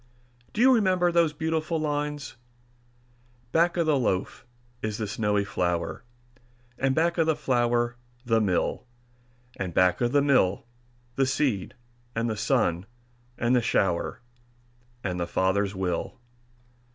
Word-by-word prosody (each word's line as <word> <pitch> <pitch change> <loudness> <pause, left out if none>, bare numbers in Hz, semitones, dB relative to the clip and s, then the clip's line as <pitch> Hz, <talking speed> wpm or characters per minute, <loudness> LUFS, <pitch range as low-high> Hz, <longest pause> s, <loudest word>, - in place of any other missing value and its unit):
Do 215 - -2
you 260 +1 +7
remember 185 -6 +3
those 170 -2 +3
beautiful 160 +1 -1
lines, 145 -2 -3 1.2
"Back 170 +3 +2
of 170 - +2
the 150 -3 +2
loaf 110 +1 -2 0.3
is 110 -1 -3
the 110 - -2
snowy 105 0 0
flour, 90 -3 -2 0.8
And 135 0 +1
back 170 +2 +1
of 160 - +3
the 160 - +3
flour, 120 -2 +1 0.3
the 115 -1 +2
mill; 100 +5 0 0.7
And 90 -3 -4
back 90 +3 +3
of 120 0 +2
the 140 0 +3
mill, 125 -10 +2 0.5
the 135 -1 +3
seed, 130 -8 -1 0.4
and 115 +1 0
the 110 - -1
sun, 105 -6 0 0.5
and 120 +2 +2
the 125 - +3
shower, 95 -6 0 0.8
And 90 -3 -2
the 85 - -2
Father's 95 +3 0
will." 90 -3 -2
120 Hz, 135 wpm, -26 LUFS, 100-150 Hz, 1.2 s, you